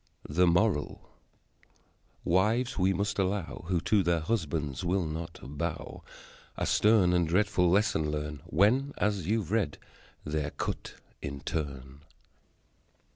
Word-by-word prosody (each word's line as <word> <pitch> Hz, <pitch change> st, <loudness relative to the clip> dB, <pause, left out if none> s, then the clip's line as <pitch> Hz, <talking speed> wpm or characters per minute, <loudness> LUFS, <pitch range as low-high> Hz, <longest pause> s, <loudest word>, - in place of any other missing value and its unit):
The 90 Hz, +4 st, +3 dB
Moral: 85 Hz, -2 st, +1 dB, 1.2 s
Wives, 110 Hz, +8 st, +2 dB
we 95 Hz, +1 st, +3 dB
must 100 Hz, +2 st, -1 dB
allow, 95 Hz, -3 st, -2 dB
Who 90 Hz, -1 st, +1 dB
to 100 Hz, +4 st, +3 dB
their 85 Hz, -2 st, +1 dB
husbands 80 Hz, -6 st, -2 dB
will 90 Hz, 0 st, +1 dB
not 80 Hz, +2 st, -5 dB
bow, 75 Hz, +5 st, -5 dB, 0.6 s
A -, -, -1 dB
stern 105 Hz, -5 st, +4 dB
and 85 Hz, -2 st, +2 dB
dreadful 90 Hz, 0 st, +2 dB
lesson 90 Hz, -5 st, +2 dB
learn 75 Hz, -1 st, -4 dB
When, 125 Hz, -, +3 dB
as 100 Hz, -5 st, 0 dB
you've 105 Hz, -4 st, 0 dB
read, 105 Hz, -10 st, 0 dB, 0.5 s
they're 75 Hz, -1 st, -1 dB
cut -, -, -5 dB, 0.3 s
in 70 Hz, 0 st, -5 dB
turn. 70 Hz, -3 st, -5 dB
90 Hz, 125 wpm, -29 LUFS, 75-100 Hz, 1.2 s, stern